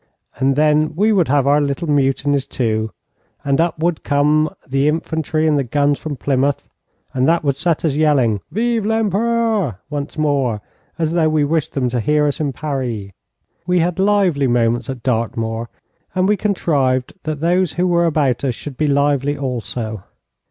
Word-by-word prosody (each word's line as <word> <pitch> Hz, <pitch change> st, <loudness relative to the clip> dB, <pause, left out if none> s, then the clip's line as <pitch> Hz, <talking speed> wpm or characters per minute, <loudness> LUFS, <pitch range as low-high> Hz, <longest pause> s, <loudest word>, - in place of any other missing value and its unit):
And 135 Hz, 0 st, +1 dB
then 155 Hz, +1 st, +2 dB
we 215 Hz, +5 st, +3 dB
would 180 Hz, -5 st, +3 dB
have 140 Hz, 0 st, +2 dB
our 145 Hz, +1 st, +4 dB
little 145 Hz, +4 st, -2 dB
mutinies, 140 Hz, -1 st, +1 dB
too, 110 Hz, -3 st, -1 dB, 0.6 s
and 140 Hz, +2 st, +2 dB
up 170 Hz, -1 st, 0 dB
would 165 Hz, +1 st, -1 dB
come 150 Hz, +2 st, +2 dB, 0.2 s
the 135 Hz, +2 st, +1 dB
infantry 160 Hz, 0 st, -1 dB
and 150 Hz, -2 st, +3 dB
the -, -, +1 dB
guns 145 Hz, +3 st, +1 dB
from 155 Hz, -2 st, -5 dB
Plymouth, 140 Hz, +1 st, 0 dB, 0.5 s
and 130 Hz, -1 st, +1 dB
that 170 Hz, 0 st, +2 dB
would 140 Hz, -2 st, +1 dB
set 165 Hz, +3 st, 0 dB
us 155 Hz, -, +1 dB
yelling 135 Hz, -9 st, +2 dB
'Vive 230 Hz, 0 st, 0 dB
l'Empereur' 220 Hz, -, 0 dB
once 145 Hz, +1 st, -4 dB
more, 140 Hz, -7 st, 0 dB, 0.4 s
as 160 Hz, -2 st, 0 dB
though 165 Hz, -2 st, +2 dB
we 155 Hz, -1 st, +2 dB
wished 160 Hz, +1 st, -1 dB
them 130 Hz, -3 st, 0 dB
to 120 Hz, 0 st, -1 dB
hear 150 Hz, +5 st, +2 dB
us 145 Hz, -, -1 dB
in 145 Hz, -3 st, -1 dB
Paris. 125 Hz, -8 st, -4 dB, 0.6 s
We 180 Hz, 0 st, +2 dB
had 175 Hz, +2 st, 0 dB
lively 190 Hz, -8 st, +2 dB
moments 120 Hz, 0 st, +1 dB
at 130 Hz, -3 st, -6 dB
Dartmoor, 115 Hz, -1 st, -2 dB, 0.5 s
and 185 Hz, 0 st, +2 dB
we 210 Hz, -, +3 dB
contrived 140 Hz, -11 st, 0 dB
that 155 Hz, -1 st, -4 dB
those 175 Hz, +1 st, +1 dB
who 180 Hz, -, 0 dB
were 170 Hz, -1 st, +2 dB
about 145 Hz, -6 st, +1 dB
us 130 Hz, -4 st, 0 dB
should 140 Hz, +1 st, -9 dB
be 155 Hz, -, +1 dB
lively 145 Hz, 0 st, +1 dB
also. 120 Hz, -5 st, -4 dB
145 Hz, 175 wpm, -18 LUFS, 130-165 Hz, 0.6 s, our